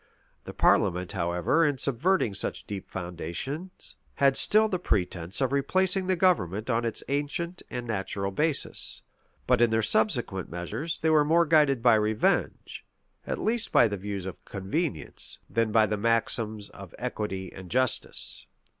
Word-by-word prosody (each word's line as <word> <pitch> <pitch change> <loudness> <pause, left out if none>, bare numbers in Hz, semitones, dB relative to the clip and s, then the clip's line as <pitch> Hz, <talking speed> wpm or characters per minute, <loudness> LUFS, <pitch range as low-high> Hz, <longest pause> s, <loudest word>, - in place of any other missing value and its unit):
The - - -7
parliament, 90 -2 +2
however, 85 - +1
in 145 -3 +1
subverting 140 - +1
such 95 - -3
deep 100 -2 -7
foundations, 95 - -6 0.2
had 140 -1 +3
still 215 +1 +5
the 185 -4 -2
pretence 90 - -1
of 135 - +1
replacing 185 +7 +1
the 185 - +2
government 110 - +1
on 115 +1 +1
its 115 - -2
ancient 150 +5 -2
and 125 -1 -5
natural 100 -2 -2
basis: 150 +7 -1 0.4
but - - +3
in 120 - +5
their 110 0 +1
subsequent 110 -4 +1
measures, 90 - -4
they 160 - +1
were 155 -1 +5
more 165 +3 +3
guided 150 -6 +3
by 120 -2 +6
revenge, 110 0 0 0.4
at - - -2
least 230 +1 -1
by 120 - +6
the 100 - -3
views 100 -1 -5
of 95 - -8
convenience, 100 - -1
than 115 -1 0
by 110 0 +5
the 105 0 -2
maxims 110 -1 -1
of - - -12
equity 95 -3 -4
and 95 -2 -10
justice. 130 +2 -1
115 Hz, 155 wpm, -27 LUFS, 100-155 Hz, 0.4 s, by